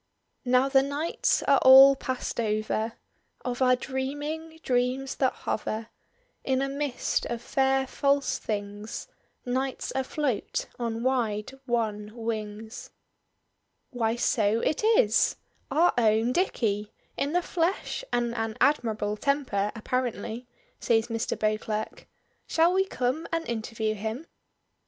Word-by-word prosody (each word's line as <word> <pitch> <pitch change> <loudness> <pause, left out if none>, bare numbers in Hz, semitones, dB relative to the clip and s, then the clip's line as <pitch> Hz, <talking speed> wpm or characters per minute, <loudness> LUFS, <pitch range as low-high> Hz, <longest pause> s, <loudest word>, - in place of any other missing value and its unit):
"Now 255 +2 +4
the 270 -1 +5
nights 285 +4 0
are 280 -1 +4
all 270 +1 +9
past 260 -2 -4
over 215 0 -1 0.5
Of 250 0 -3
our 255 -1 +5
dreaming, 290 +5 -4
dreams 255 +2 0
that 260 -2 +2
hover 220 +1 -4 0.5
In 265 0 +1
a - - 0
mist 280 -2 -1
of 235 - -3
fair 265 +2 +1
false 280 +1 +1
things: 205 0 -5 0.4
Night's 260 +2 -2
afloat 265 -3 -1
on 230 -1 -2
wide 230 -5 0 0.2
wan 215 -3 -1
wings." 220 -1 -5 1.0
"Why, 230 -3 0
so 220 -2 +2
it 310 - 0
is! 460 +3 +4 0.3
Our 320 +6 +3
own 225 +1 +3
Dicky, 215 - 0 0.2
in 285 +3 -1
the 355 0 +2
flesh 345 +8 -1
and 240 -1 0
an 225 -1 -3
admirable 215 -7 +1
temper 255 -7 0
apparently," 240 0 -3 0.3
says 225 0 +2
Mr. 225 -1 -2
Beauclerk. 215 0 -2 0.4
"Shall 335 +2 +3
we 385 +1 +3
come 260 +1 -1
and 330 0 -2
interview 220 -1 -2
him?" 220 +8 -4
245 Hz, 120 wpm, -27 LUFS, 220-275 Hz, 1.0 s, all